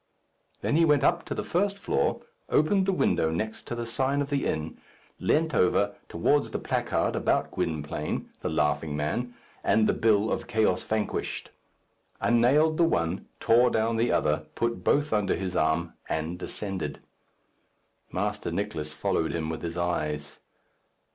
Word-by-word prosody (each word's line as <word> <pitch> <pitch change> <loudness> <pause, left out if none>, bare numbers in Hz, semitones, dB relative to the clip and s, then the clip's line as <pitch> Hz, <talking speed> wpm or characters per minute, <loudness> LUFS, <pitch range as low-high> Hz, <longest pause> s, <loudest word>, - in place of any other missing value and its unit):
Then 145 - +1
he 165 - +5
went 150 -3 +4
up 170 +3 +2
to - - -4
the - - -2
first 200 +3 0
floor, 200 - 0 0.3
opened 190 +5 +3
the - - +4
window 80 - +2
next 110 +7 -3
to - - -3
the 120 0 -3
sign 130 +4 0
of 145 0 -2
the 140 -1 +1
inn, 80 +1 -3 0.4
leant 160 0 +1
over 100 0 +3 0.2
towards 140 +12 +2
the - - -3
placard - - 0
about - - +1
Gwynplaine, 75 -1 -3
the - - -3
laughing 75 0 0
man, 120 +12 -2 0.3
and 110 +2 +3
the - - +3
bill 110 -1 +2
of - - -2
"Chaos 110 -6 +2
Vanquished;" 110 -1 -2 0.7
unnailed 140 +7 +4
the 170 - +4
one, 85 - 0
tore 120 +2 +5
down 115 0 +1
the 115 +2 +2
other, 75 0 +1
put 115 -6 -1
both 145 +5 +2
under 105 -2 +2
his 95 -2 -4
arm, 80 +2 +1 0.2
and 80 +3 -2
descended. 95 -4 -4 1.1
Master 105 +2 -2
Nicless 80 -7 -3
followed 80 +1 0
him 80 -1 -2
with 80 - -5
his 85 0 -4
eyes. 75 -4 -2
105 Hz, 155 wpm, -27 LUFS, 80-135 Hz, 1.1 s, he